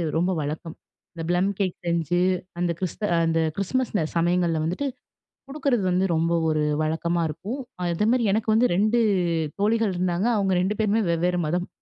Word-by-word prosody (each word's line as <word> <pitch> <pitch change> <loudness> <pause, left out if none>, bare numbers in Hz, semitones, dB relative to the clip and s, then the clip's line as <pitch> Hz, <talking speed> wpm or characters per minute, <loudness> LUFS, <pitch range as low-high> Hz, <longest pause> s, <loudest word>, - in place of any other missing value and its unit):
ரொம்ப 175 +3 +1
வழக்கம். 155 +2 -4 0.4
இந்த 165 -1 -6
ப்ளம் 180 +2 +2
கேக் 190 -3 0
செஞ்சு, 170 0 0 0.4
அந்த 175 -1 +1
கிறிஸ்த 185 +3 -4 0.2
அந்த 165 0 +1 0.2
கிறிஸ்மஸ்ல 215 +1 -1
சமயங்கள்ல 170 -1 +1
வந்துட்டு 185 - -2 0.6
கொடுக்குறது 270 -6 0
வந்து 185 +2 +2
ரொம்ப 165 +1 +1 0.2
ஒரு 155 -1 +1 0.2
வழக்கமா 165 +2 0
இருக்கும். 210 - -5 0.3
அதேமாரி 215 +8 +1
எனக்கு 220 +1 0
வந்து 235 +3 +4
2 215 +5 +2 0.6
தோழிகள் 220 -1 +2
இருந்தாங்க. 180 +3 0
அவுங்க 195 -2 +1
2 200 +3 -1
பேருமே 215 +1 +2
வெவ்வேற 175 +1 +1
மதம். 175 +3 -1
180 Hz, 145 wpm, -24 LUFS, 170-215 Hz, 0.6 s, வந்து